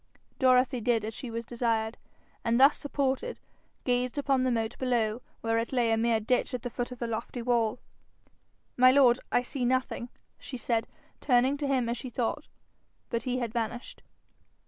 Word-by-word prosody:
Dorothy 255 -1 +4
did 225 -2 +1
as 220 - -4
she 250 - -6
was 230 0 -4
desired, 230 -1 -1 0.5
and 235 +1 +2
thus 275 +3 +7
supported 285 - -2 0.5
gazed 250 +1 0
upon 275 -2 +2
the 255 - +2
moat 225 -1 -1
below, 240 -3 0 0.2
where 225 0 +1
it 230 - -3
lay 240 -3 +2
a - - +4
mere 230 0 +2
ditch 250 +4 0
at 245 - -6
the 245 - -4
foot 245 +2 -3
of 250 - -7
the 235 - -3
lofty 230 +1 -4
wall. 235 -2 +1 1.0
'My 255 +1 +7
lord, 260 -2 +5
I 245 - +3
see 255 +1 -4
nothing,' 255 -1 0 0.3
she 255 - -7
said, 230 -1 -1 0.3
turning 255 +1 +3
to 285 -1 -2
him, 260 -3 +1
as 235 +1 -1
she 255 - -6
thought; 245 +5 -2 0.6
but 235 - 0
he 250 - 0
had 235 -3 -3
vanished. 235 +1 -4
245 Hz, 180 wpm, -29 LUFS, 230-255 Hz, 1.0 s, thus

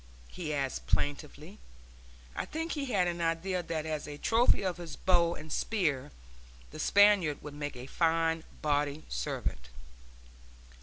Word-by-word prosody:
he 165 -4 -5
asked, 140 -3 -2
plaintively. 150 +6 -2 0.8
I - - -2
think 325 +2 -4
he 290 -3 -2
had 200 -9 +2
an 175 0 -2
idea 170 +3 0
that 160 -2 -3
as 155 -1 -3
a 145 -1 -7
trophy 230 +5 +3
of 185 -2 -1
his 170 -2 -7
bow 170 -2 +3
and 155 0 -10
spear 150 - 0 0.6
the - - -9
Spaniard 200 -5 +4
would 150 0 -7
make 145 -1 -5
a 125 0 -7
fine 165 +2 +1 0.2
body 145 0 0
servant. - - -3
160 Hz, 145 wpm, -31 LUFS, 145-180 Hz, 0.8 s, Spaniard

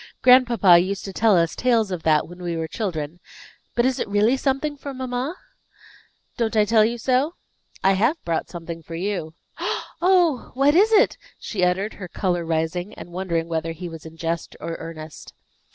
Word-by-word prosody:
"Grandpapa 240 -8 +6
used 190 +3 -2
to 195 - -6
tell 220 -3 +4
us 165 -1 +1
tales 230 -5 +2
of 180 -3 -3
that, 155 -2 +2
when 175 +2 -12
we 170 -2 -3
were 160 0 -2
children. 165 -4 -4 0.6
But 240 - +2
is 260 -1 +1
it - - -2
really 210 +5 +3
something 275 +2 -1
for 280 -1 -7
mamma?" 255 +4 -3 1.0
"Don't 230 -1 -1
I 210 -1 +4
tell 220 0 +4
you 235 +2 0
so? 260 +7 +1 0.5
I 195 - +5
have 230 - +2
brought 165 -1 -1
something 170 -1 -7
for 165 +1 -9
you." 175 -3 -3 0.7
"Oh! 350 -7 +3
What 275 +2 +4
is 410 +7 +5
it?" 425 -2 +4 0.2
she 190 -5 -3
uttered, 190 +4 +1
her 185 - -5
color 175 0 -1
rising, 165 +4 -2
and 175 - -10
wondering 170 -2 -2
whether 165 0 -2
he 175 +2 -7
was 165 -2 -9
in 160 0 -11
jest 165 0 -3
or 165 +1 -5
earnest. 155 -2 -9
190 Hz, 185 wpm, -23 LUFS, 165-250 Hz, 1.0 s, Grandpapa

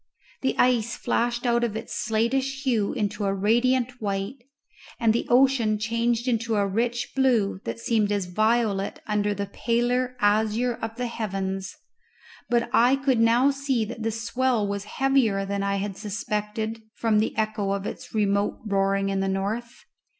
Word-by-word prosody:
The 265 - 0
ice 240 -2 +2
flashed 240 +1 -1
out 235 0 +2
of 225 -3 -1
its 225 +1 -5
slatish 265 +5 0
hue 230 -7 +1
into 210 -3 -2
a 195 0 0
radiant 245 +4 +1
white, 200 +4 -2 0.6
the 230 0 +2
ocean 245 -4 +4
changed 230 +2 0
into 230 -2 0
a 200 -1 +2
rich 235 +5 -1
blue 235 -8 +2
that - - -3
seemed 220 -3 +1
as 200 -2 0
violet 215 +1 0
under 205 -1 0
the 200 +1 -2
paler 245 +4 0
azure 220 +3 +2
of 225 0 -4
the 250 0 -3
heavens; 195 -4 -3 0.7
but 240 -1 +2
I 245 +3 +5
could 270 -3 +1
now 235 +4 +4
see 270 -5 -1
that 230 +1 -7
the 225 - 0
swell 230 0 0
was 200 0 -3
heavier 235 -6 +1
than 200 0 -2
I 200 0 0
had 200 0 -3
suspected 215 +1 -3
from 220 -2 +2
the 215 - -1
echo 215 -2 -1
of 200 0 -2
its - - -7
remote 200 -1 +1
roaring 195 -1 +1
in 195 0 0
the 195 0 0
north. 210 +5 -3
225 Hz, 160 wpm, -25 LUFS, 205-240 Hz, 0.7 s, I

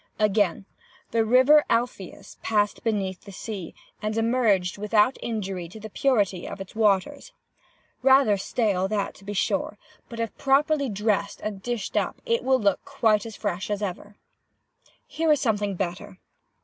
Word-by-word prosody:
"Again. 205 -3 +1 0.5
'The 225 0 +2
river 260 +6 +6
Alpheus 230 -5 -3
passed 210 -2 0
beneath 195 -5 -1
the 200 - -10
sea, 195 -2 -7 0.3
and 215 +1 -2
emerged 225 -6 +1
without 210 +4 +3
injury 195 -6 -4
to 220 - -11
the 220 0 -9
purity 205 -10 +1
of - - -7
its 195 +2 -9
waters.' 220 - +1 0.7
Rather 265 -4 +5
stale 195 -2 0
that, 200 0 -2
to - - -18
be 205 +1 -5
sure, 200 - -1 0.3
but, 230 -2 -8
if 230 -1 -3
properly 280 +1 +2
dressed 210 -1 -1
and 205 -2 -5
dished 240 -3 -4
up, - - -1 0.2
will 260 0 +2
look 200 -4 +1
quite 225 -6 +1
as 220 - -9
fresh 190 -2 -3
as 205 0 -2
ever. 205 +2 -5 0.9
"Here 325 -1 0
is 295 - +4
something 210 -6 0
better. 185 +2 -5
210 Hz, 150 wpm, -25 LUFS, 195-235 Hz, 0.9 s, river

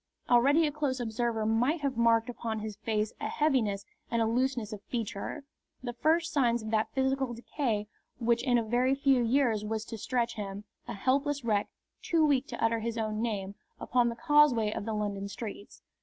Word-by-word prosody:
Already 280 +7 +5
a 295 - 0
close 285 -3 -1
observer 225 -1 -1
might 245 +9 +1
have 275 -2 -1
marked 230 0 +3
upon 230 -2 -4
his 215 -1 -5
face 215 0 -1
a - - -1
heaviness 225 -10 +1 0.2
and 230 -1 +1
looseness 245 -3 0
of 205 - -7
feature, 230 +5 -4 0.4
the 240 -1 -4
first 325 +6 +1
signs 240 -6 +2
of 220 - -5
that 220 -1 +1
physical 265 -2 0
decay 230 -3 -2 0.3
which 235 0 +1
in 245 -2 +2
a 235 - +1
very 245 +4 +2
few 275 -2 +3
years 235 -3 +2
was 215 0 -3
to 225 - -7
stretch 240 +1 -1
him, 200 -1 -6 0.2
a - - -5
helpless 275 +6 0
wreck, 210 -3 +1 0.3
too 325 -2 +2
weak 280 -2 +2
to 235 - -5
utter 225 0 +2
his 230 +1 -3
own 215 -1 -2
name, 200 -4 -2 0.3
upon 245 -1 +2
the 235 - -4
causeway 295 -8 +4
of - - -4
the 220 - -2
London 200 -1 -2
streets. 205 0 -8
235 Hz, 185 wpm, -30 LUFS, 220-265 Hz, 0.4 s, Already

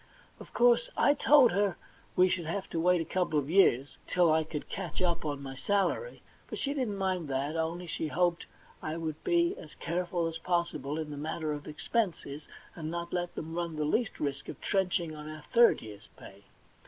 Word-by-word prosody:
Of - - -12
course 240 -1 +4
I 285 - +5
told 285 -4 +6
her 200 0 +1 0.4
we 180 0 +6
should 180 -3 -1
have 195 +3 -3
to 165 - -1
wait 180 +1 +3
a - - -3
couple 175 -2 0
of 145 +1 -1
years, 145 -8 +4
till 175 -3 +4
I 160 0 +3
could 155 -1 -6
catch 180 -5 -5
up 170 -2 0
on 145 -2 -3
my 135 -1 -6
salary; 200 - 0 0.2
but - - -5
she 280 - -1
didn't 245 -8 -2
mind 185 -4 -1
that, 140 +3 -1
only 165 +2 -2
she 160 -1 -3
hoped 175 +2 +1 0.3
I 155 +1 -3
would 160 -2 -4
be 345 +1 +2
as 155 - -12
careful 175 0 -1
as 165 0 -3
possible 160 -5 -1
in 155 -1 -4
the 145 - -6
matter 155 +1 -2
of 145 0 -7
expenses, 155 - -2 0.3
and 160 -2 -5
not 170 +1 -4
let 175 -1 -2
them 160 +1 -5
run 170 -1 -2
the 155 0 -1
least 220 +9 0
risk 140 -2 -3
of - - -7
trenching 180 -4 0
on 150 0 -8
our 155 -1 -8
third 235 0 +6
year's 105 -1 -11
pay. 100 +1 -13
170 Hz, 205 wpm, -30 LUFS, 155-185 Hz, 0.4 s, told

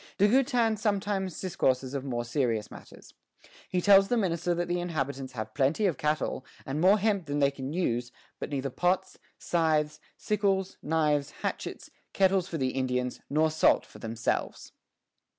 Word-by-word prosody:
De 205 - +5
Goutin 240 -2 +3
sometimes 200 -3 -1
discourses 130 -7 0
of 140 -2 -3
more 120 -3 -3
serious 115 -4 -1
matters. - - -13 0.6
He 180 - 0
tells 195 0 +6
the 245 - +1
minister 175 -4 0
that 175 +1 -1
the 175 0 0
inhabitants 140 -6 -3
have 110 -2 -5
plenty 145 +9 +1
of 180 -6 0
cattle, 150 -3 -1 0.2
and 140 +3 -2
more 190 +4 +6
hemp 200 -4 0
than 145 0 -2
they 140 -1 +3
can 135 0 -6
use, 120 -8 -1 0.3
but - - -4
neither 135 -2 -2
pots, 185 +5 0 0.2
scythes, 155 -3 +1 0.2
sickles, 195 -2 0
knives, 150 -2 +1
hatchets, - - -4 0.2
kettles 190 -2 +3
for 165 - -4
the 130 -3 0
Indians, 125 -1 -2
nor 155 +2 +2
salt 160 - +3
for - - -15
themselves. 115 0 -3
160 Hz, 160 wpm, -28 LUFS, 135-190 Hz, 0.6 s, tells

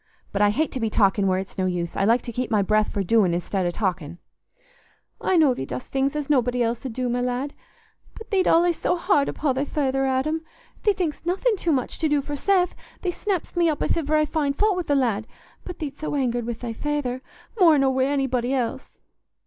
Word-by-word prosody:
But 200 - -1
I 205 - +5
hate 305 +10 0
to 260 - -4
be 225 -2 0
talking 200 -2 +2
where 185 0 +2
it's 190 +1 -6
no 185 - +1
use: 175 -2 -3
I 195 - +1
like 230 +4 +3
to 235 - -5
keep 245 +2 -3
my 210 -3 +2
breath 215 +2 +2
for 200 - -1
doing 190 -3 +3
i'stead 180 +1 -1
o' - - +1
talking." 175 -4 -3 1.0
"I 375 - +2
know 300 -5 +5
thee 245 - -5
dost 125 - -6
things 275 +1 0
as 295 -2 -2
nobody 250 -3 +2
else 235 0 -2
'ud 260 -4 -5
do, 250 +1 -2
my 245 +1 0
lad. 250 +3 -2 0.6
But 445 - -11
thee't 380 -2 +2
allays 340 0 +3
so 355 - +1
hard 340 -5 +2
upo' 290 -3 0
thy 265 +2 -1
feyther, 270 -2 0
Adam. 280 +5 0 0.4
Thee 415 - +3
think'st 340 -4 -3
nothing 405 +6 +1
too 345 -3 -1
much 260 -4 -1
to 315 - +1
do 290 -1 +2
for 290 +1 -4
Seth: 360 +3 +2 0.3
thee 360 - 0
snapp'st 375 -1 -3
me 340 -1 +3
up 300 - -1
if - - +1
iver 310 -2 0
I 305 0 +3
find 290 -2 -1
faut 420 -2 +3
wi' 365 - -1
th' 290 -4 +1
lad. 225 -5 0 0.4
But 360 - -7
thee't 290 -3 -6
so 305 - -3
angered 245 -4 -1
wi' 240 - -1
thy 235 0 -6
feyther, 265 -2 -2 0.4
more 330 -5 +6
nor 270 -1 +3
wi' 260 0 +2
anybody 270 -2 0
else." 245 -3 -3
265 Hz, 230 wpm, -24 LUFS, 230-310 Hz, 1.0 s, more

